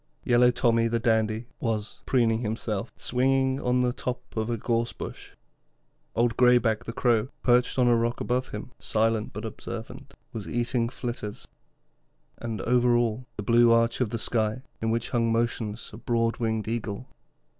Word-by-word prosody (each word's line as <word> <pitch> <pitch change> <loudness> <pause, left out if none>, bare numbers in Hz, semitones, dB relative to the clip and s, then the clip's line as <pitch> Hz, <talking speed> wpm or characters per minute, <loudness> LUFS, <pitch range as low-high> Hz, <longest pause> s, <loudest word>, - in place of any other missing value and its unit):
Yellow 125 0 +5
Tommy, 115 -2 +2
the 115 0 0
dandy, 110 -1 +1
was 110 -3 -2
preening 115 -3 +3
himself, 110 -1 -3
swinging 130 +1 +1
on 125 0 +2
the 125 -1 +1
top 125 0 -3 0.2
of 110 0 -1
a 120 - 0
gorse 115 +1 0
bush. - - -8 0.8
Old 115 0 +2
Greyback, 120 -2 +4
the - - -4
Crow, 115 -1 +2 0.2
perched 125 +1 +3
on 125 -1 +4
a 120 - +5
rock 115 +1 0
above 125 +1 -1
him, 105 +4 -7
silent 110 0 0
but - - -6
observant, - - -8 0.2
was 110 -3 -6
eating 120 0 0
flitters; 120 -5 -6 0.9
and 115 -2 -4
over 120 0 +3
all, 120 +1 0
the 105 - -3
blue 120 +2 +5
arch 115 +1 +3
of 120 - +1
the 115 - -2
sky, 110 +2 -1 0.2
in 110 - 0
which 115 +1 -1
hung 115 -1 +2
motionless 115 -2 -2
a - - -8
broad 115 -1 0
winged 110 -3 -1
eagle. 115 0 -3
115 Hz, 165 wpm, -27 LUFS, 110-125 Hz, 0.9 s, Yellow